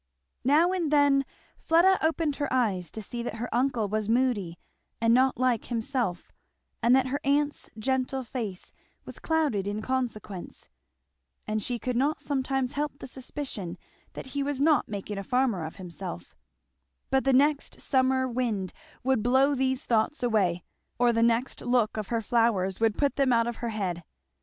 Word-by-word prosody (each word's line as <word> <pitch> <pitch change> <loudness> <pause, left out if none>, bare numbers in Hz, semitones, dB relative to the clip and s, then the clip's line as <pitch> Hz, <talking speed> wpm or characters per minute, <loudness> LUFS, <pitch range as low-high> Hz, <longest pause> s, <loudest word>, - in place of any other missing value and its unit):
Now 305 +7 +4
and 355 -5 0
then 285 -2 +4 0.4
Fleda 350 +4 +4
opened 315 -2 +1
her 290 -2 -2
eyes 200 -9 +1
to 220 - -7
see 235 +4 -5
that 235 -2 -4
her 235 +2 -4
uncle 245 -3 +1
was 215 +1 -2
moody 225 -8 +1 0.4
and 230 0 +3
not 260 +1 +3
like 250 -3 +1
himself, 230 -6 -2 0.5
and 240 +2 +5
that 265 -1 +3
her 280 +2 -1
aunt's 290 +1 0
gentle 260 +3 -1
face 220 -6 -6 0.3
was - - -10
clouded 295 -12 0
in 205 +1 -2
consequence; 230 -8 -4 0.8
and 215 0 -1
she 245 +3 -2
could 250 +1 -3
not 285 +5 +1
sometimes 270 -2 -1
help 295 -1 -3
the - - -9
suspicion 255 -9 -6 0.4
that - - -7
he 285 - -1
was 280 -1 -2
not 300 +1 +3
making 205 0 -4
a - - -5
farmer 245 -5 +1
of 160 - -7
himself; 160 - -8 0.8
but 265 0 +3
the 270 - +3
next 285 +2 +2
summer 260 -1 +2
wind 230 -6 -2 0.3
would 260 -3 +2
blow 265 +5 +3
these 265 +1 0
thoughts 235 +5 +1
away, 195 -7 +1 0.3
or 240 -1 +3
the 230 - +1
next 235 +2 +1
look 245 -3 +1
of 215 -2 -3
her 230 -1 -1
flowers 220 -5 +1
would 225 -2 +2
put 285 -1 +1
them 275 -2 +3
out 230 -1 +4
of 240 -1 -4
her 235 - -3
head. 185 -6 -3
245 Hz, 170 wpm, -27 LUFS, 215-270 Hz, 0.8 s, and